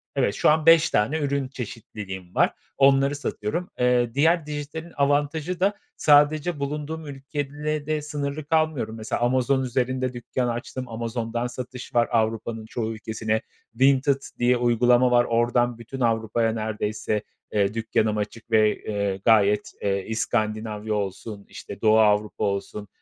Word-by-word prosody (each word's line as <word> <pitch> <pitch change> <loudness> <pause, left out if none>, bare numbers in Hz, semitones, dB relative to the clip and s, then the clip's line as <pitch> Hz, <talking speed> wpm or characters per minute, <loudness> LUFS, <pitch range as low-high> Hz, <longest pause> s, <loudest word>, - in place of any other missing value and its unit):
evet, 130 -7 +1
şu - - +3
an 155 0 +3
5 165 -1 +7
tane 115 +10 +1
ürün 140 -2 -1
çeşitliliğim 105 -7 -8
var. - - +3 0.2
Onları 140 +1 +4
satıyorum. 145 +4 -3
Eee, 125 -1 +2
diğer 160 +4 +3
dijitalin 150 +3 -6
avantajı 145 +5 0
da 195 +3 +2 0.2
sadece 150 +2 +4
bulunduğum 150 +3 -4
ülkeyle 145 +2 -4
de 155 -1 0
sınırlı 145 0 -4
kalmıyorum. 155 -8 0
Mesela 110 +1 -3
Amazon 130 +2 +2
üzerinde 130 0 -1
dükkân 125 +1 -2
açtım, 120 +2 -4
Amazon’dan 115 +1 -3
satış 125 +1 -8
var 120 -1 +4
Avrupa’nın 115 -1 -1
çoğu 110 0 -3
ülkesine. 110 0 -2 0.3
Vinted 135 +2 +3 0.2
diye 125 +1 +3
uygulama 120 +1 +3
var. 120 0 +5
Oradan 120 +1 +1
bütün 115 +3 -8
Avrupa’ya 115 -1 +1
neredeyse, 110 -1 -2 0.3
eee, 100 -1 +2
dükkânım 110 -1 0
açık 110 +2 -5
ve, 110 -1 +4
eee, 100 -2 -2
gayet, 105 -2 +4
eee, 100 -1 -1
İskandinavya 110 -1 -2
olsun, 100 0 -4
işte, 100 +1 -9
Doğu 110 0 +5
Avrupa 105 -1 +2
olsun, 100 +1 -3
120 Hz, 140 wpm, -24 LUFS, 110-140 Hz, 0.3 s, 5